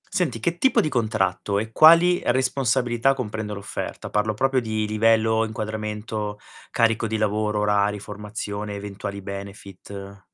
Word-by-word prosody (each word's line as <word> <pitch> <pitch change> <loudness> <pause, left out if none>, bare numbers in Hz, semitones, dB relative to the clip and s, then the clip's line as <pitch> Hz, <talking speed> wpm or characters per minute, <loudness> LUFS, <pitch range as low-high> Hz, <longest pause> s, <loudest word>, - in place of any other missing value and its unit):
Senti, 135 -11 -1
che 170 +6 0
tipo 265 +8 +3
di 155 - -1
contratto 105 -5 0
e 110 +2 -3
quali 170 +6 +6
responsabilità, 130 0 +2
comprende 110 -4 -4
l'offerta? 100 0 -6
Parlo 105 +1 0
proprio 135 +4 +1
di 110 -2 -2
livello, 110 +1 +3
inquadramento, 105 -1 -4 0.3
carico 115 0 +1
di 110 - -2
lavoro, 105 0 0
orari, 105 0 +2
formazione, 105 0 -6
eventuali 100 0 -6
benefit. 100 0 -9
110 Hz, 130 wpm, -24 LUFS, 105-115 Hz, 0.3 s, quali